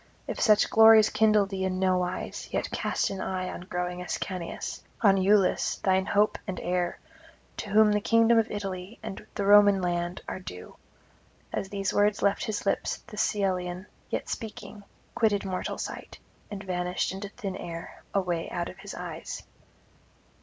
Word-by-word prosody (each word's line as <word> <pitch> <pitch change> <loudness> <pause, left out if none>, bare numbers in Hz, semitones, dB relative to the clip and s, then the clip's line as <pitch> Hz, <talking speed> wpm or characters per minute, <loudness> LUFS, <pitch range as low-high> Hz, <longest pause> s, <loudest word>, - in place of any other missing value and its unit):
if - - -5
such 215 -3 +5
glories 220 -1 +7
kindle 215 -2 +4
thee 195 -1 -4
in 185 -1 -1
nowise, 185 -1 -1
yet - - -2
cast - - -1
an 195 -1 -4
eye 185 -1 -2
on - - -6
growing 180 0 -3
Ascanius, 180 0 -4 0.2
on 200 -4 +6
Iülus 195 0 +3
thine 190 0 +2
hope 210 +1 +2
and 185 -2 -3
heir, 175 0 -1 0.6
to 210 - -5
whom 210 +1 +5
the 210 0 +1
kingdom 230 +1 +4
of 225 - 0
Italy 195 0 -5
and 215 -3 -6
the 200 - -1
Roman 205 -1 +7
land 175 0 -2
are - - -4
due.' 90 - -9 0.8
As 190 - -3
these 195 -1 -2
words 205 0 +2
left 200 0 +2
his 210 -1 -3
lips 195 - 0
the - - -11
Cyllenian, 185 -3 -1 0.2
yet - - -3
speaking, 215 -2 -7 0.3
quitted 205 -3 +1
mortal 185 -1 -3
sight - - -6 0.3
and 205 -1 -6
vanished 180 -1 -1
into 195 +1 -6
thin 200 -4 -5
air 170 -2 -7
away 180 -4 -1
out 175 0 -3
of 185 - -12
his 200 0 -8
eyes. 170 -2 -6
195 Hz, 160 wpm, -28 LUFS, 180-205 Hz, 0.8 s, glories